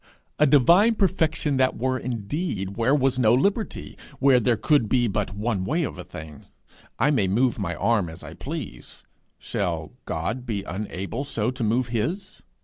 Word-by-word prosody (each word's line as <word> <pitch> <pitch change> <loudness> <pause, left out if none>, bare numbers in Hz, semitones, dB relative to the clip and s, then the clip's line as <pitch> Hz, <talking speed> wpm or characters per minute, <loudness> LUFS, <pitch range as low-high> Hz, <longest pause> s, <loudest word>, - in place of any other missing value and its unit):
A 150 - +5
divine 170 - +5
perfection 160 -7 +1
that 130 0 +2
were 130 +2 0
indeed, 115 - -3
where 120 +5 +2
was 135 -2 +1
no 115 -1 +5
liberty! 135 - -1 0.2
where 135 -2 +5
there 120 -1 +2
could 145 -6 +2
be 120 -2 +3
but 100 -1 -2
one 105 -2 -1
way 160 - 0
of - - -5
a - - -5
thing! 75 -2 -10 0.5
I 145 - +3
may 110 -10 +2
move 120 +5 +1
my 100 - -2
arm 105 -7 +1
as 80 +1 -10
I 80 +1 -9
please: 140 - -7 0.3
shall - - -3
God 110 +11 -3
be 105 -5 -3
unable 100 +5 -4
so 115 -4 -1
to 130 -1 -4
move 115 +3 +1
his? 165 - -3
120 Hz, 170 wpm, -24 LUFS, 100-145 Hz, 0.5 s, A